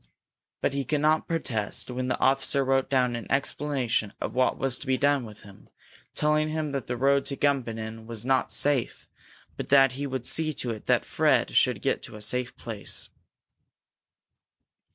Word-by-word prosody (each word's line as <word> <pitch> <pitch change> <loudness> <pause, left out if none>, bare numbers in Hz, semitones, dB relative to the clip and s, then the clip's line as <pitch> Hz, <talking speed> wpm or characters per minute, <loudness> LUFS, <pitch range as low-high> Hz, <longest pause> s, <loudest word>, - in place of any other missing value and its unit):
But - - +1
he 140 0 -1
could 145 +3 -1
not 155 +1 +2
protest 125 -9 -2
when 125 +1 -3
the 130 - 0
officer 135 +1 +2
wrote 135 0 +1
down 125 -3 +2
an 115 -3 -7
explanation 135 -6 0
of - - -4
what 130 0 +2
was 135 -2 0
to 140 - -10
be 130 -1 +2
done 140 -2 +2
with 105 -2 -12
him, 100 -1 -16 0.5
telling 155 0 +2
him 155 -1 -2
that 140 -2 -3
the 125 - -2
road 140 +2 +3
to 140 - -3
Gumbinnen 115 -5 -1
was 115 -1 -6
not 130 0 +2
safe, 140 -4 0 0.5
but - - -5
that 135 -1 +6
he 140 +3 -4
would 130 -2 -4
see 155 +1 +1
to 120 - -3
it 110 -2 -8
that - - +3
Fred - - +2
should - - +3
get - - 0
to - - -10
a 105 - -8
safe 125 +4 -2
place. 110 -3 -4
130 Hz, 180 wpm, -27 LUFS, 120-140 Hz, 0.5 s, that